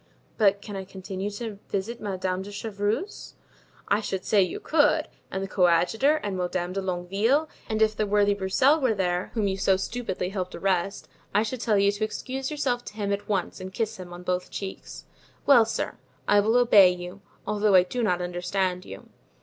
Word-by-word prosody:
"But 200 Hz, -2 st, +3 dB
can 205 Hz, -, -7 dB
I 190 Hz, -, -4 dB
continue 190 Hz, +1 st, -5 dB
to 210 Hz, 0 st, -6 dB
visit 225 Hz, +5 st, -3 dB
Madame 185 Hz, -2 st, -2 dB
de 200 Hz, +2 st, -8 dB
Chevreuse?" 205 Hz, -, -3 dB, 0.5 s
"I 205 Hz, -, +2 dB
should 190 Hz, -3 st, -4 dB
say 205 Hz, -, +4 dB
you 180 Hz, -2 st, -1 dB
could! 310 Hz, 0 st, +2 dB, 0.2 s
and 190 Hz, +1 st, -3 dB
the -, -, -3 dB
coadjutor 190 Hz, -, +3 dB
and 200 Hz, -2 st, -2 dB
Madame 180 Hz, 0 st, -2 dB
de 195 Hz, -, -2 dB
Longueville; 195 Hz, -, +1 dB, 0.2 s
and 220 Hz, 0 st, +2 dB
if 215 Hz, 0 st, +2 dB
the 210 Hz, 0 st, 0 dB
worthy 205 Hz, 0 st, +3 dB
Broussel 255 Hz, +10 st, +3 dB
were 255 Hz, -6 st, +2 dB
there, 180 Hz, -1 st, -1 dB
whom 215 Hz, -3 st, +1 dB
you 190 Hz, 0 st, -1 dB
so 195 Hz, -1 st, +3 dB
stupidly 190 Hz, -3 st, -3 dB
helped 185 Hz, -2 st, -4 dB
arrest, 195 Hz, 0 st, -1 dB, 0.3 s
I 210 Hz, -, +5 dB
should 235 Hz, +2 st, -4 dB
tell 215 Hz, -4 st, +2 dB
you 200 Hz, 0 st, +4 dB
to 205 Hz, +1 st, -4 dB
excuse 260 Hz, +5 st, -3 dB
yourself 260 Hz, -5 st, -1 dB
to -, -, -8 dB
him 200 Hz, -2 st, -1 dB
at 200 Hz, +1 st, -5 dB
once 190 Hz, -2 st, -1 dB
and 185 Hz, 0 st, -6 dB
kiss 220 Hz, +1 st, -2 dB
him 180 Hz, -1 st, -9 dB
on 175 Hz, 0 st, -9 dB
both 180 Hz, 0 st, -2 dB
cheeks." 195 Hz, -1 st, -7 dB, 0.4 s
"Well, 245 Hz, -5 st, +7 dB
sir, -, -, -3 dB, 0.3 s
I 205 Hz, -, +5 dB
will 220 Hz, +4 st, +3 dB
obey 210 Hz, -6 st, +7 dB
you, 180 Hz, +2 st, -6 dB, 0.2 s
although 210 Hz, -1 st, +2 dB
I 180 Hz, -, +8 dB
do 240 Hz, +7 st, -3 dB
not 180 Hz, -5 st, +1 dB
understand 180 Hz, +1 st, -2 dB
you." -, -, -10 dB
200 Hz, 195 wpm, -26 LUFS, 185-220 Hz, 0.5 s, I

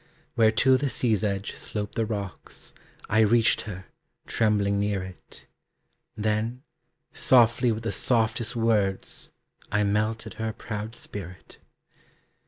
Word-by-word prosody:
Where 110 Hz, -1 st, +5 dB
to 130 Hz, +4 st, +4 dB
the 140 Hz, +1 st, -1 dB
sea's 110 Hz, -5 st, +1 dB
edge 100 Hz, -1 st, -2 dB
slope 105 Hz, -1 st, -4 dB
the 115 Hz, -1 st, -1 dB
rocks, 100 Hz, -4 st, -5 dB, 0.3 s
I 110 Hz, -, +2 dB
reached 110 Hz, +1 st, +4 dB
her, 95 Hz, -2 st, -7 dB, 0.4 s
trembling 100 Hz, -2 st, +1 dB
near 100 Hz, -2 st, 0 dB
it. 95 Hz, 0 st, -12 dB, 0.7 s
Then, 110 Hz, +4 st, -1 dB, 0.5 s
softly 120 Hz, -1 st, +4 dB
with 110 Hz, +1 st, -3 dB
the 115 Hz, -, -1 dB
softest 115 Hz, +1 st, +2 dB
words, 105 Hz, -4 st, 0 dB, 0.4 s
I 105 Hz, 0 st, +2 dB
melted 110 Hz, +2 st, -1 dB
her 110 Hz, 0 st, -2 dB
proud 110 Hz, +1 st, -6 dB
spirit. 90 Hz, -6 st, -8 dB
110 Hz, 120 wpm, -26 LUFS, 100-115 Hz, 0.7 s, Where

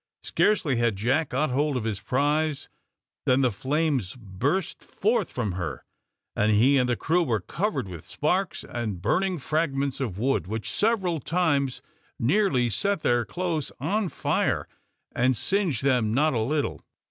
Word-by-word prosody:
Scarcely 165 Hz, -, +2 dB
had 115 Hz, -3 st, +2 dB
Jack 130 Hz, +10 st, +1 dB
got 140 Hz, +2 st, 0 dB
hold 145 Hz, +1 st, +1 dB
of 120 Hz, -, -3 dB
his 110 Hz, -3 st, -2 dB
prize 145 Hz, +2 st, 0 dB, 0.6 s
than 130 Hz, +1 st, +4 dB
the 125 Hz, -2 st, +3 dB
flames 135 Hz, -, -1 dB
burst 125 Hz, -, -2 dB
forth 215 Hz, -2 st, 0 dB
from 115 Hz, -5 st, -2 dB
her, 85 Hz, -8 st, -5 dB, 0.5 s
and 105 Hz, +1 st, +2 dB
he 130 Hz, +7 st, +5 dB
and 125 Hz, -1 st, +1 dB
the 120 Hz, -, +2 dB
crew 170 Hz, +7 st, +1 dB
were 120 Hz, -10 st, +1 dB
covered 170 Hz, -, -2 dB
with 85 Hz, -4 st, -8 dB
sparks 180 Hz, +5 st, -1 dB
and 110 Hz, -6 st, -4 dB
burning 180 Hz, -, +1 dB
fragments 140 Hz, -2 st, -1 dB
of 115 Hz, -9 st, -3 dB
wood, 130 Hz, -3 st, 0 dB
which 110 Hz, +2 st, -3 dB
several 195 Hz, -7 st, +1 dB
times 145 Hz, -6 st, 0 dB, 0.3 s
nearly 135 Hz, -, +2 dB
set 200 Hz, -, 0 dB
their 120 Hz, -4 st, +2 dB
clothes 165 Hz, -, -2 dB
on 195 Hz, -, 0 dB
fire -, -, 0 dB, 0.4 s
and 130 Hz, 0 st, +2 dB
singed 180 Hz, -, 0 dB
them 125 Hz, -5 st, +2 dB
not 150 Hz, +2 st, +3 dB
a 115 Hz, -, 0 dB
little. 145 Hz, +7 st, -1 dB
135 Hz, 155 wpm, -26 LUFS, 115-160 Hz, 0.6 s, he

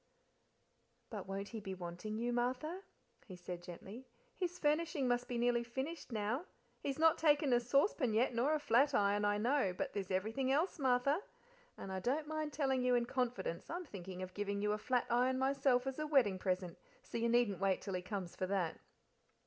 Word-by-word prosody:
"But 205 Hz, -4 st, -5 dB
won't 195 Hz, +1 st, -4 dB
he 225 Hz, -, -5 dB
be 195 Hz, -2 st, -5 dB
wanting 180 Hz, +4 st, -5 dB
you, 240 Hz, +1 st, -1 dB
Martha?" 260 Hz, +9 st, -1 dB, 0.5 s
he 185 Hz, -, -8 dB
said 175 Hz, 0 st, -7 dB
gently. 195 Hz, +8 st, -9 dB, 0.3 s
"His 360 Hz, -1 st, -2 dB
furnishing 300 Hz, -2 st, +1 dB
must 245 Hz, 0 st, +1 dB
be 245 Hz, -, -2 dB
nearly 240 Hz, 0 st, +2 dB
finished 265 Hz, +5 st, -5 dB
now. 225 Hz, -, -1 dB, 0.3 s
He's 275 Hz, -1 st, -3 dB
not 320 Hz, 0 st, +5 dB
taken 295 Hz, -4 st, +4 dB
a 240 Hz, -, +5 dB
saucepan 255 Hz, -, +2 dB
yet, 245 Hz, +3 st, +3 dB
nor 260 Hz, +7 st, +2 dB
a -, -, 0 dB
flat 280 Hz, 0 st, +3 dB
iron, 205 Hz, 0 st, +3 dB
I 205 Hz, 0 st, +2 dB
know; 230 Hz, -4 st, +1 dB
but -, -, -2 dB
there's 195 Hz, -2 st, -3 dB
everything 220 Hz, +8 st, 0 dB
else, 320 Hz, +5 st, +1 dB
Martha; 270 Hz, +5 st, +2 dB, 0.6 s
and 195 Hz, -, -6 dB
I 190 Hz, -, -2 dB
don't 275 Hz, +10 st, 0 dB
mind 310 Hz, -1 st, -2 dB
telling 270 Hz, -3 st, +1 dB
you 250 Hz, 0 st, +4 dB
in 240 Hz, -1 st, +2 dB
confidence 245 Hz, -9 st, -2 dB
I'm 350 Hz, +2 st, -4 dB
thinking 185 Hz, -, -7 dB
of 185 Hz, 0 st, -7 dB
giving 200 Hz, 0 st, -2 dB
you 210 Hz, +1 st, +1 dB
a 210 Hz, -, -1 dB
flat 250 Hz, +2 st, +1 dB
iron 250 Hz, +2 st, +3 dB
myself 265 Hz, -1 st, +2 dB
as 270 Hz, +2 st, -3 dB
a 305 Hz, -, -1 dB
wedding 240 Hz, -11 st, +3 dB
present, 185 Hz, -2 st, -2 dB, 0.2 s
so -, -, -4 dB
you 235 Hz, +1 st, +1 dB
needn't 235 Hz, -6 st, +3 dB
wait 195 Hz, -1 st, +2 dB
till 195 Hz, -, -4 dB
he 180 Hz, -, -1 dB
comes 185 Hz, -2 st, -5 dB
for 185 Hz, -, -2 dB
that." 185 Hz, -4 st, -1 dB
240 Hz, 195 wpm, -36 LUFS, 200-275 Hz, 0.6 s, not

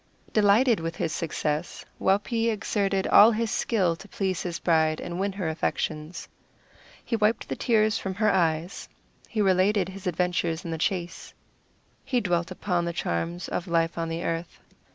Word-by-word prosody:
Delighted 215 Hz, +2 st, +4 dB
with 165 Hz, +1 st, -4 dB
his 160 Hz, -, -2 dB
success, 155 Hz, 0 st, -3 dB
Waupee 225 Hz, +4 st, +1 dB
exerted 200 Hz, -3 st, 0 dB
all 210 Hz, -, +8 dB
his 230 Hz, 0 st, -1 dB
skill 185 Hz, -8 st, +1 dB
to 195 Hz, -, -12 dB
please 190 Hz, -3 st, -2 dB
his 175 Hz, -2 st, -3 dB
bride 160 Hz, -2 st, +2 dB
and 175 Hz, +1 st, -5 dB
win 195 Hz, 0 st, -1 dB
her 190 Hz, -4 st, -3 dB
affections. 160 Hz, 0 st, -3 dB, 0.8 s
He 230 Hz, -, -1 dB
wiped 215 Hz, +1 st, +1 dB
the -, -, -3 dB
tears 215 Hz, -3 st, +2 dB
from 190 Hz, -1 st, -4 dB
her 215 Hz, +2 st, +2 dB
eyes; 170 Hz, 0 st, 0 dB, 0.4 s
he 215 Hz, -3 st, 0 dB
related 190 Hz, 0 st, +2 dB
his 190 Hz, 0 st, -8 dB
adventures 175 Hz, 0 st, -1 dB
in 165 Hz, -, -4 dB
the 160 Hz, -, -3 dB
chase; 175 Hz, 0 st, -3 dB, 0.7 s
he 250 Hz, -, 0 dB
dwelt 175 Hz, -5 st, 0 dB
upon 180 Hz, -2 st, -1 dB
the 170 Hz, -, -2 dB
charms 85 Hz, -, -3 dB
of 180 Hz, -, -3 dB
life 165 Hz, -1 st, +1 dB
on 165 Hz, -1 st, -3 dB
the 165 Hz, +1 st, -3 dB
earth. 165 Hz, +1 st, -4 dB
180 Hz, 165 wpm, -26 LUFS, 165-205 Hz, 0.8 s, all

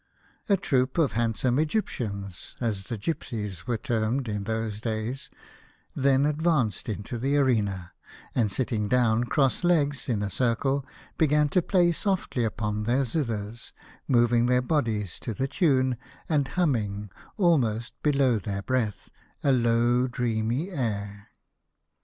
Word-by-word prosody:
A 200 Hz, -, +5 dB
troop 130 Hz, -7 st, 0 dB
of 160 Hz, -5 st, +2 dB
handsome 120 Hz, +3 st, +1 dB
Egyptians 105 Hz, -, -3 dB
— -, -, -25 dB
as 105 Hz, -5 st, -2 dB
the 115 Hz, -, -4 dB
gipsies 105 Hz, -, -4 dB
were 120 Hz, -, 0 dB
termed 115 Hz, +4 st, -1 dB
in 105 Hz, -2 st, -3 dB
those 110 Hz, -1 st, -3 dB
days 115 Hz, +3 st, -3 dB, 0.3 s
— -, -, -28 dB, 0.3 s
then 135 Hz, 0 st, +3 dB
ad 150 Hz, 0 st, 0 dB
vanced 135 Hz, -, +1 dB
into 110 Hz, +4 st, -5 dB
the 140 Hz, +4 st, +1 dB
arena, 105 Hz, -10 st, +1 dB, 0.4 s
and 110 Hz, -5 st, +1 dB
sitting 110 Hz, -4 st, -1 dB
down 120 Hz, -1 st, +3 dB
cross 135 Hz, +3 st, +1 dB
legs, 145 Hz, -6 st, +2 dB
in 105 Hz, -4 st, 0 dB
a 100 Hz, -, -3 dB
circle, 130 Hz, +4 st, +1 dB, 0.4 s
began 150 Hz, -1 st, +3 dB
to 180 Hz, -, +3 dB
play 175 Hz, -1 st, +3 dB
softly 185 Hz, -, 0 dB
upon 105 Hz, -1 st, -2 dB
their 125 Hz, +4 st, +2 dB
zithers, 115 Hz, -5 st, -3 dB, 0.3 s
moving 120 Hz, -1 st, +3 dB
their 125 Hz, 0 st, +4 dB
bodies 115 Hz, -, -1 dB
to 115 Hz, -, -5 dB
the 135 Hz, -, -1 dB
tune, 130 Hz, -, +2 dB, 0.3 s
and 145 Hz, -4 st, +1 dB
humming, 105 Hz, -, -1 dB, 0.3 s
almost 120 Hz, -, +2 dB
below 135 Hz, -6 st, +3 dB
their 100 Hz, 0 st, -4 dB
breath, 115 Hz, -5 st, -2 dB, 0.3 s
a 140 Hz, -, +4 dB
low 120 Hz, 0 st, +3 dB
dreamy 120 Hz, -, -1 dB
air. 105 Hz, -, -3 dB
120 Hz, 140 wpm, -27 LUFS, 110-140 Hz, 0.4 s, A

